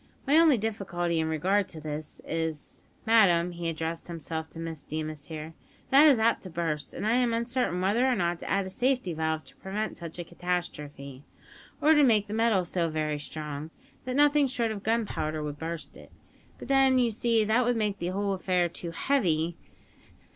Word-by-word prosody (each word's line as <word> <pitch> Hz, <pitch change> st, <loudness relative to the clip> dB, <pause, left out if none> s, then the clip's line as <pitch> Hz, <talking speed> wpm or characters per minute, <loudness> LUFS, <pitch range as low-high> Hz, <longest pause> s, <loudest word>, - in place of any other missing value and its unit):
My 285 Hz, +2 st, +3 dB
only 320 Hz, -6 st, +6 dB
difficulty 180 Hz, -6 st, -2 dB
in 160 Hz, -, 0 dB
regard 185 Hz, +6 st, +1 dB
to 165 Hz, -, -10 dB
it 155 Hz, -, -10 dB, 0.4 s
is, 160 Hz, -2 st, -4 dB, 0.2 s
madam," 180 Hz, -6 st, +5 dB
he 170 Hz, -1 st, -3 dB
addressed 165 Hz, +1 st, -4 dB
himself 160 Hz, -1 st, -5 dB
to 165 Hz, -, -11 dB
Miss 165 Hz, -2 st, -5 dB
Deemas 155 Hz, -1 st, -5 dB
here, 155 Hz, 0 st, -7 dB, 0.4 s
"that 285 Hz, +3 st, +8 dB
it -, -, +9 dB
is 275 Hz, -, +5 dB
apt 225 Hz, +1 st, +2 dB
to 185 Hz, -, -8 dB
burst, 160 Hz, -4 st, -3 dB
and -, -, -4 dB
I 220 Hz, -, +2 dB
am 240 Hz, -1 st, +2 dB
uncertain 235 Hz, -5 st, -1 dB
whether 215 Hz, +7 st, +2 dB
or 255 Hz, -, +2 dB
not 175 Hz, -4 st, 0 dB
to -, -, -7 dB
add 195 Hz, -1 st, +1 dB
a 190 Hz, -, -6 dB
safety 250 Hz, -4 st, 0 dB
valve 160 Hz, 0 st, -1 dB
to -, -, -16 dB
prevent 210 Hz, +3 st, -4 dB
such 170 Hz, -1 st, -8 dB
a 175 Hz, -, -4 dB
catastrophe, 150 Hz, -6 st, -5 dB, 0.6 s
or 310 Hz, +2 st, +5 dB
to 295 Hz, -, +5 dB
make 220 Hz, -6 st, +4 dB
the 210 Hz, -, -7 dB
metal 220 Hz, -5 st, +2 dB
so 170 Hz, -1 st, -1 dB
very 155 Hz, -1 st, -2 dB
strong, 150 Hz, 0 st, -6 dB, 0.4 s
that 255 Hz, 0 st, -3 dB
nothing 290 Hz, 0 st, +5 dB
short 240 Hz, -4 st, -1 dB
of 210 Hz, -2 st, -5 dB
gunpowder 200 Hz, -9 st, -1 dB
would 145 Hz, -1 st, -5 dB
burst 160 Hz, -3 st, -5 dB
it; -, -, -14 dB, 0.5 s
but -, -, -9 dB
then, 270 Hz, -1 st, +4 dB
you 240 Hz, -2 st, +3 dB
see, 225 Hz, 0 st, +2 dB
that 220 Hz, +4 st, +2 dB
would 245 Hz, 0 st, +1 dB
make 210 Hz, -2 st, -1 dB
the 175 Hz, -, -2 dB
whole 200 Hz, +2 st, -1 dB
affair 180 Hz, -2 st, +1 dB
too 170 Hz, 0 st, -7 dB
heavy. 170 Hz, -, 0 dB
180 Hz, 200 wpm, -28 LUFS, 160-230 Hz, 0.6 s, it